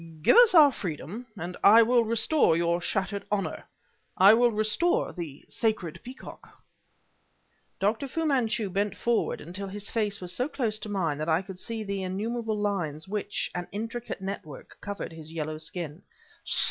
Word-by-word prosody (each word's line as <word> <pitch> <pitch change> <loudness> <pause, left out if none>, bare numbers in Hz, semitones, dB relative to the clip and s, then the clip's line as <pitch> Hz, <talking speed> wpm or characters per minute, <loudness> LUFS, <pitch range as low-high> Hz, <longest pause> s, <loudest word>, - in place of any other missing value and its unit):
"Give - - +6
us 480 -6 +7
our 300 -4 +9
freedom, 190 - -6
and 175 +1 -5
I 225 +3 +8
will 240 +1 +4
restore 225 - +3
your 170 +1 +1
shattered 195 +3 -2
honor 205 -2 -2 0.5
I 195 +3 +8
will 240 +2 +5
restore 215 +11 +1
the 165 -6 -7
sacred 215 -8 -1
peacock!" 255 +2 -12 1.2
Dr. 220 +7 0
Fu 325 +5 -2
Manchu 235 -8 +1
bent 200 +2 0
forward 235 -1 0
until 185 +5 -7
his 205 +1 -5
face 210 -3 -1
was 180 -1 -4
so 250 +7 0
close 230 -8 -2
to 210 - -7
mine 170 -8 -1
that 155 +2 -2
I 165 +4 +2
could 185 -1 -10
see 225 +1 -4
the 200 -1 -3
innumerable 215 +4 -2
lines 185 -7 -2
which, 205 0 -2
an 180 0 -4
intricate 225 +1 -5
network, 190 -7 -7
covered 205 -3 -5
his 160 -1 -10
yellow 155 -1 -4
skin. 165 0 -5
205 Hz, 160 wpm, -27 LUFS, 175-230 Hz, 1.2 s, our